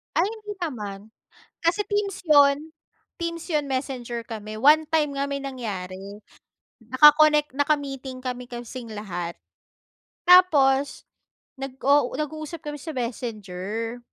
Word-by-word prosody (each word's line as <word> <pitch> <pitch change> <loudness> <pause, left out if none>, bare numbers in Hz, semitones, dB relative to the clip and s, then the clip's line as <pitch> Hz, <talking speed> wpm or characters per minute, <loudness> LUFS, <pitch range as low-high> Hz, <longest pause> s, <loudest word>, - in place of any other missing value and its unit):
Ay, 345 +4 +3
hindi 425 -1 -7
naman. 210 - -5 0.5
Kasi 355 +5 +1
teams 410 -2 -2
yon. 290 0 +4 0.5
Teams 335 -1 -3
yon, 300 -3 0
messenger 250 -3 -3
kami. 215 -1 -7
One 300 +6 +5
time 300 -3 +1
nga 280 - 0
may 280 0 -2
nangyari. 195 -8 -5 0.8
Naka-connect, 295 +5 +5
naka-meeting 275 -3 -1
kami 250 -1 -4
kasing 240 -1 -8
lahat, 175 -5 -5 1.0
tapos 285 -7 +5 0.5
nag-u 270 0 +1
nag-uusap 310 +1 -5
kami 295 0 -5
sa 320 - -6
Messenger, 225 -1 -4
275 Hz, 110 wpm, -24 LUFS, 235-305 Hz, 1.0 s, One